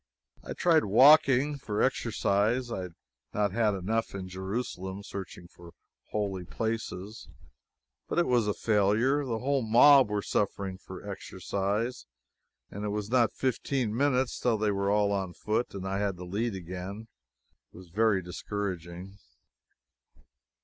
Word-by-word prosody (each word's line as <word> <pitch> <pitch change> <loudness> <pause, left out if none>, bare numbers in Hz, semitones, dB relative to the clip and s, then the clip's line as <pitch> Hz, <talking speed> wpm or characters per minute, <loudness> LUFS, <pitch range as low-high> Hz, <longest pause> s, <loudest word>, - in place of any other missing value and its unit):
I - - -5
tried 165 -3 +3
walking, 140 +5 +5
for 105 -6 -1
exercise 115 -1 +1
I 95 - -3
had 90 -2 -8 0.4
not 105 -1 +1
had 105 -1 +1
enough 110 +4 -2
in 95 -1 -5
Jerusalem 95 0 -5
searching 95 -3 -8
for 85 -1 -15 0.4
holy 100 -3 -2
places. 110 -1 -4 0.8
But - - -3
it 175 - +4
was 120 -4 +2
a 105 - 0
failure. 110 +7 +2
The 120 -4 -2
whole 135 +3 0
mob 125 +3 +6
were 105 -1 -1
suffering 100 -2 -2
for 95 +1 -10
exercise, 100 - -3 0.6
and 100 - -6
it 105 - -1
was 105 +1 -3
not 120 -3 +4
fifteen 130 -3 -1
minutes 130 -1 +1
till 120 -3 +1
they 105 0 +1
were 100 0 0
all 105 0 +2
on 95 -3 -2
foot 110 +3 -2
and 95 -1 -5
I 95 +1 -1
had 100 -3 -1
the 90 - -8
lead 105 +4 -2
again. 95 +4 -7 0.6
It - - -15
was 90 -1 -13
very 105 0 +2
discouraging. 90 0 -5
105 Hz, 145 wpm, -29 LUFS, 95-120 Hz, 0.8 s, mob